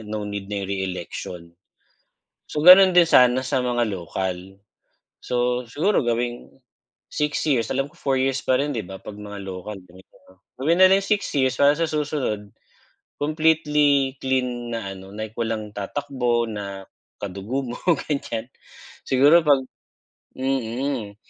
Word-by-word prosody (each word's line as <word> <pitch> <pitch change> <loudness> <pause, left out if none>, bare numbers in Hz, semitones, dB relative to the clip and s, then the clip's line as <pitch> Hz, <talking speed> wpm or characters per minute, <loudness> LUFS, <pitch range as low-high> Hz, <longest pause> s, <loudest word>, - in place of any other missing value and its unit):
no 105 -1 -4
need 100 -1 -6
na 100 -1 -3
yung 95 - -6
re-election. 90 -2 -5 1.0
So, 150 - -2
ganun 185 +1 +10
din 175 -1 +5
sana 125 -4 +5
sa 130 -2 0
mga 120 -2 0
local. 95 +2 -5 0.6
So, 125 0 -1
siguro 165 - +1
gawing 120 +1 -2 0.6
6 150 0 -1
years. 130 -7 +1
Alam 135 +3 -2
ko - - -23
4 135 -1 0
years 135 0 0
pa 130 - +1
rin, 145 +3 0
'di 110 -9 -4
ba, 95 - -8
'pag 100 +2 -10
mga 105 -1 -8
lokal 95 +2 -7
ganito 90 +1 -19
'no? 95 0 -22 0.2
Gawin 160 +7 +1
na 185 - +9
rin 195 +1 +3
6 205 0 0
years 130 -2 +1
para 145 +1 +5
sa 165 - -1
susunod, 145 -9 -2 0.7
completely 150 -3 +2
clean 125 -3 -2
na 110 -4 -4
ano, 95 +1 -12
like 110 +1 -7
walang 110 -2 -2
tatakbo 120 +2 -2
na 100 -2 -7 0.3
kadugo 100 +7 -4
mo, 120 -1 -6 0.3
ganyan. 120 -5 -3 0.6
Siguro 145 +6 +6
'pag 140 -4 +3 0.7
mm. 130 -3 -2
125 Hz, 145 wpm, -23 LUFS, 105-145 Hz, 1.0 s, ganun